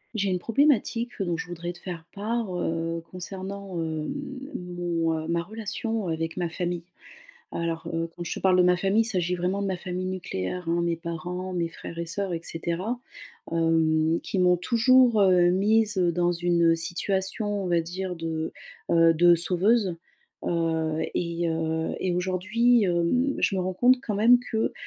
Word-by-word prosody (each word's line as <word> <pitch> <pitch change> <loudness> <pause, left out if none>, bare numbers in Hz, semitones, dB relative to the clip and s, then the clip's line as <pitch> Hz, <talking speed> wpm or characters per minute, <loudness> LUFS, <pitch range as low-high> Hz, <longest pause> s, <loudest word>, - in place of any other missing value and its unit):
J'ai 200 -2 0
une 180 - 0
problématique 240 0 +2
dont 175 -4 -1
je 165 - -5
voudrais 175 0 -5
te 175 - -10
faire 175 -3 -7
part, 215 -1 -2
heu, 165 0 -2
concernant, 190 0 -6
hem, 160 -1 -3 0.4
mon, 175 -2 -2
heu - - -7
ma 170 0 0
relation 220 +1 -3
avec 165 0 -2
ma 175 -2 -2
famille. 175 0 -3 0.7
Alors, 165 0 -3
heu, 165 0 -1
quand 175 - -5
je 165 - -4
te - - -6
parle 185 -1 +4
de 180 - +6
ma 180 0 +4
famille, 195 +4 +3
il - - -4
s'agit 180 -5 0
vraiment 180 +3 -1
de 200 - -1
ma 190 -1 -1
famille 180 +1 -4
nucléaire, 180 - -4
hein 170 +1 +1
-mes 170 -1 0
parents, 175 +2 -5
mes 170 -2 -1
frères 165 0 -9
et 170 - -3
sœurs 190 +3 -2
et 165 - -2
cetera. 170 +9 -3 0.5
Hem, 165 -1 +2
qui 195 - -3
m'ont 180 -1 +4
toujours, 235 +4 +4
heu, 180 -3 +5
mise, 210 +2 +2
heu, 175 -2 +3
dans 175 +1 +1
une 170 -1 +3
situation, 195 +4 -2
on - - -2
va 170 -2 +2
dire, 180 +2 -4
de, 160 -1 -3 0.4
heu, 165 0 +6
de 175 +2 +6
sauveuse. 185 +3 +2 0.5
Heu 160 -2 0
et 170 0 -1
heu 160 0 -1
et 185 - 0
aujourd'hui, 205 +6 +2
hem, 185 +10 +1
je 195 - +1
me - - +1
rends 185 +1 -1
compte 250 +6 +5
quand 215 - -3
même 230 +5 +6
que, 225 -2 -1
180 Hz, 180 wpm, -26 LUFS, 165-200 Hz, 0.7 s, de